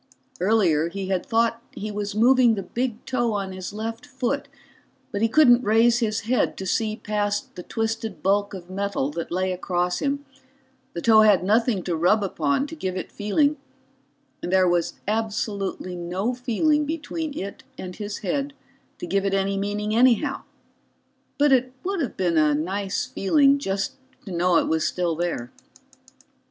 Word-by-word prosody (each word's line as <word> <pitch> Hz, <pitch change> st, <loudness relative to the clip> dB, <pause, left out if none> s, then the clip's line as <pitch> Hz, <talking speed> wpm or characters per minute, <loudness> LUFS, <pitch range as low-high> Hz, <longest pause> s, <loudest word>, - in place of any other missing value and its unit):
Earlier, 175 Hz, -5 st, +2 dB
he 190 Hz, +1 st, -5 dB
had 185 Hz, -2 st, 0 dB
thought 230 Hz, 0 st, +1 dB
he 215 Hz, +1 st, -5 dB
was 205 Hz, 0 st, -4 dB
moving 240 Hz, +1 st, +5 dB
the 195 Hz, -, -4 dB
big 240 Hz, 0 st, -3 dB
toe 240 Hz, -3 st, 0 dB
on 195 Hz, -2 st, -2 dB
his 185 Hz, -1 st, -6 dB
left 225 Hz, +3 st, -5 dB
foot, 265 Hz, +2 st, -2 dB, 0.6 s
but 200 Hz, -, -3 dB
he 225 Hz, -, +3 dB
couldn't 245 Hz, -2 st, +6 dB
raise 230 Hz, +3 st, +4 dB
his 215 Hz, -3 st, 0 dB
head 245 Hz, +4 st, 0 dB
to 190 Hz, -, -5 dB
see 215 Hz, +3 st, 0 dB
past 205 Hz, -1 st, -2 dB
the 180 Hz, -, -7 dB
twisted 220 Hz, -4 st, -3 dB
bulk 200 Hz, +1 st, +1 dB
of 175 Hz, -2 st, -9 dB
metal 195 Hz, -6 st, -2 dB
that 165 Hz, +2 st, -5 dB
lay 185 Hz, +1 st, 0 dB
across 180 Hz, -1 st, -1 dB
him, 285 Hz, 0 st, -2 dB, 0.7 s
the 170 Hz, -, -5 dB
toe 220 Hz, -2 st, +7 dB
had 205 Hz, -5 st, +5 dB
nothing 215 Hz, 0 st, +2 dB
to 175 Hz, -, -1 dB
rub 180 Hz, +6 st, +3 dB
upon 165 Hz, -, 0 dB
to 325 Hz, -, -8 dB
give 185 Hz, -, -3 dB
it -, -, -5 dB
feeling, 285 Hz, +9 st, +1 dB, 0.8 s
and 175 Hz, -, -4 dB
there 185 Hz, -1 st, +4 dB
was 175 Hz, -1 st, +1 dB
absolutely 205 Hz, -4 st, -2 dB
no 180 Hz, +7 st, -2 dB
feeling 260 Hz, +5 st, +1 dB
between 315 Hz, -1 st, -4 dB
it 200 Hz, +1 st, -6 dB, 0.2 s
and 180 Hz, -1 st, -7 dB
his 205 Hz, -1 st, -5 dB
head 280 Hz, 0 st, -1 dB, 0.4 s
to -, -, -6 dB
give 195 Hz, +3 st, 0 dB
it 195 Hz, 0 st, +1 dB
any 195 Hz, 0 st, 0 dB
meaning 205 Hz, +2 st, -2 dB
anyhow. 255 Hz, +3 st, +3 dB, 1.0 s
But 290 Hz, 0 st, +4 dB
it 255 Hz, -1 st, +3 dB
would 385 Hz, -1 st, -1 dB
have 265 Hz, -, -3 dB
been 175 Hz, -3 st, +1 dB
a 150 Hz, -1 st, +3 dB
nice 190 Hz, +5 st, -2 dB
feeling 280 Hz, +7 st, +3 dB
just 195 Hz, -4 st, -2 dB, 0.3 s
to 195 Hz, -, -7 dB
know 175 Hz, 0 st, +3 dB
it -, -, +2 dB
was 160 Hz, 0 st, +1 dB
still 175 Hz, -2 st, -1 dB
there. 165 Hz, -8 st, -3 dB
205 Hz, 170 wpm, -24 LUFS, 185-240 Hz, 1.0 s, toe